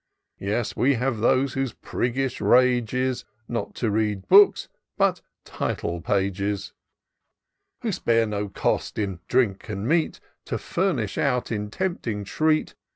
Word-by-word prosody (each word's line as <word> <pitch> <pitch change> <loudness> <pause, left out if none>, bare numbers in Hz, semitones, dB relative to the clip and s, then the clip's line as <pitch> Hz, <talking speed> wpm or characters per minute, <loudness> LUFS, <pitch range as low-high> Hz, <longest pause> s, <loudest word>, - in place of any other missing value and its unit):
Yes, 105 +4 -2
we 140 +2 +3
have 125 -1 -1
those, 130 +3 +2
whose 135 -4 -2
priggish 130 +1 -2
rage 125 -3 +4
is 130 0 -1 0.2
Not 120 - -4
to 115 -3 -1
read 105 -2 -1
books 200 +2 +6 0.2
— - - -58
but - - +2 0.2
title 85 0 -3
pages; 100 0 -1 1.1
Who - - 0
spare 115 -1 +2
no 105 -1 -3
cost - - -1
in 95 -4 -2
drink 115 -7 +1
and 105 +1 -3
meat. 160 +2 +1 0.3
To - - -2
furnish 140 - -1
out 125 -4 0
a 105 -2 -2
tempting 115 - -3
treat. 155 +9 +1
115 Hz, 140 wpm, -25 LUFS, 105-130 Hz, 1.1 s, books